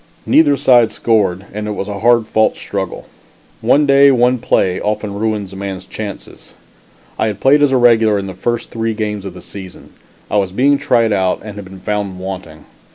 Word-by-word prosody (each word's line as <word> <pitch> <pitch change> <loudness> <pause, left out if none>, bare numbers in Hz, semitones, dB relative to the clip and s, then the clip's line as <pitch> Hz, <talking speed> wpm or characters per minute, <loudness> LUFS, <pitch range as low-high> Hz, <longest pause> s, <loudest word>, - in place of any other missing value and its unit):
Neither 145 -3 +4
side 125 -4 +4
scored 95 -5 0
and 105 +1 -4
it 105 - -2
was 100 - -4
a 100 -1 -5
hard 120 +1 +3
fought 110 0 +1
struggle. 95 -3 -5 0.6
One 150 +1 +3
day, 140 0 +6
one 125 -1 +3
play, 90 -4 +1
often 105 -1 -2
ruins 105 -2 -3
a - - -9
man's 95 -1 -6
chances. 105 -2 -9 0.6
I 110 - +1
had 105 -2 -4
played 140 +5 +4
as 145 -2 +3
a 130 - +3
regular 115 -3 +4
in 100 - -3
the 95 - -6
first 120 +4 -3
three 115 -1 -2
games 105 -2 -4
of 95 -2 -7
the - - -11
season. 95 -2 -11 0.4
I - - +1
was 95 -2 0
being 140 +7 +2
tried 120 -6 +2
out 95 -2 0
and 105 -1 -8
had 105 -1 -8
been 95 0 -12
found 100 -2 -3
wanting. 90 -5 -8
105 Hz, 200 wpm, -16 LUFS, 95-120 Hz, 0.6 s, day